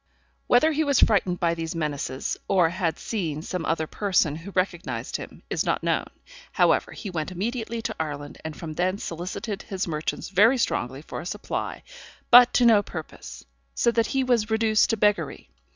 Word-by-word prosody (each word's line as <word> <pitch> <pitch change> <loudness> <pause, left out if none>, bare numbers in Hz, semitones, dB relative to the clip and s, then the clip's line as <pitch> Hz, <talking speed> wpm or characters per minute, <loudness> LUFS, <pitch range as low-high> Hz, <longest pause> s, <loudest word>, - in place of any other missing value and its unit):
Whether 275 +6 +5
he 310 +1 +1
was 280 -3 +2
frightened 190 -4 +3
by 170 -1 +2
these 165 0 -4
menaces, 145 -4 -2
or 180 -4 +4
had 170 -2 -1
seen 160 -9 -3
some 180 -1 -4
other 160 -1 0
person 185 -4 +1
who 165 +5 -9
recognised 185 -2 -2
him, - - -10
is - - -1
not - - -1
known; - - 0 0.5
however, - - +3
he 200 - -7
went 160 0 -3
immediately 225 +4 -3
to 220 - -3
Ireland, 145 -2 -5
and 160 -1 -6
from 160 -2 -6
thence 185 +4 -1
solicited 185 +5 -5
his 190 -3 -4
merchants 155 -1 -3
very 215 +7 +5
strongly 135 - -1
for - - -6
a - - -10
supply, 210 +3 -4 0.5
but 245 0 +9
to 245 - +5
no 220 -3 +6
purpose; - - -9 0.3
so 235 - +3
that 230 -1 +1
he 270 -1 0
was 235 -4 +1
reduced 220 -1 +3
to 225 - +1
beggary. 210 0 0
190 Hz, 180 wpm, -25 LUFS, 165-225 Hz, 0.5 s, but